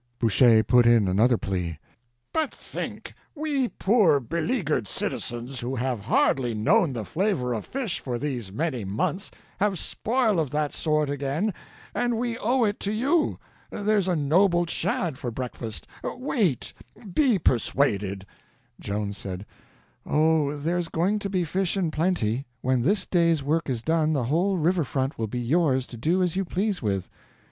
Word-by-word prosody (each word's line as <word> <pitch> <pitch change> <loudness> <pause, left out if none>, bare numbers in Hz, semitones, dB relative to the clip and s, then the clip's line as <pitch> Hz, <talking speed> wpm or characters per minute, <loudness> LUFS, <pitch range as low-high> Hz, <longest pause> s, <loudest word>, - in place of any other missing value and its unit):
Boucher 115 -1 +5
put 120 +2 +5
in 115 -4 +5
another 110 +6 +3
plea: 90 -6 -3 0.6
"But 315 -3 0
think—we 290 -4 -4
poor 195 -10 +3
beleaguered 155 - -1
citizens 120 +6 -4
who 125 +3 -3
have 125 -3 -2
hardly 120 +2 +2
known 130 - +3
the 110 -4 -4
flavor 160 - 0
of 110 - -4
fish 255 -8 -2
for 125 -3 -3
these 120 -7 -4
many 135 -1 -2
months, 105 - -2 0.3
have 200 -1 +1
spoil 225 0 +1
of 155 -4 0
that 150 +1 -1
sort 155 -2 +1
again, 145 +9 -1 0.4
and 240 -1 0
we 235 0 -1
owe 245 +3 +2
it 205 -2 0
to 200 - -2
you. 280 +10 +1 0.3
There's 205 -2 +1
a 180 - +2
noble 175 +4 +3
shad 170 -3 -1
for 125 - -3
breakfast; 115 -3 -6 0.2
wait—be 230 - -1
persuaded." 105 - +1 0.5
Joan 100 0 -3
said: 95 -1 -6 0.6
"Oh, 155 -1 +2
there's 170 +4 -1
going 190 +6 +1
to 200 - -4
be 185 -2 0
fish 185 +3 -1
in 175 -5 0
plenty; 145 - 0
when 130 -1 +1
this 190 - +2
day's 170 -4 +2
work 155 +2 0
is 120 -3 -2
done 160 +1 +2
the 135 -4 0
whole 175 +10 +1
river 170 +1 +2
front 135 +2 -2
will 110 - -1
be 125 +4 -4
yours 130 0 +2
to 125 - -11
do 170 +10 +1
as 180 -1 0
you 195 - +1
please 195 +2 -1
with." 100 -5 -1
155 Hz, 155 wpm, -26 LUFS, 120-190 Hz, 0.6 s, Boucher